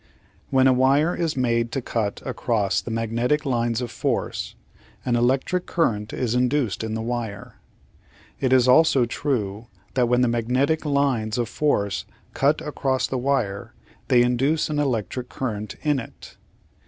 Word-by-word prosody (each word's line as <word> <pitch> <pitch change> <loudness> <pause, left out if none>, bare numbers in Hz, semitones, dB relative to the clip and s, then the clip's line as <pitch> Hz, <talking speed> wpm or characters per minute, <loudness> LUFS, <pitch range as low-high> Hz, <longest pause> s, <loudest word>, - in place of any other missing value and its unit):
When 130 -1 +3
a 130 - +6
wire 140 +6 +3
is 165 -4 -2
made 115 -2 +1
to 135 - 0
cut 105 -4 -2
across 105 -5 -1
magnetic 115 +6 0
lines 120 -2 0
of 120 -2 -4
force - - -2 0.5
an 125 - +1
electric 130 +9 +1
current 110 - 0
is 120 -3 -1
induced 125 -3 0
in 110 0 -3
the 110 - -3
wire. 115 -4 -5 0.8
It 130 - 0
is 130 -1 +5
also 135 -1 +5
true 115 -5 -2 0.3
that 125 -2 +2
when 125 0 +3
the 125 - +3
magnetic 125 +7 0
lines 135 -6 +1
of 120 -2 -1
force 100 -11 0 0.3
cut 145 +3 +2
across 135 -4 -1
the 130 - -2
wire 120 -7 -1 0.3
they 120 -1 +5
induce 135 +6 +1
an 150 - -1
electric 125 -2 -2
current 110 -5 -4
in 150 -3 +2
it. 115 - -11
125 Hz, 150 wpm, -23 LUFS, 115-135 Hz, 0.8 s, a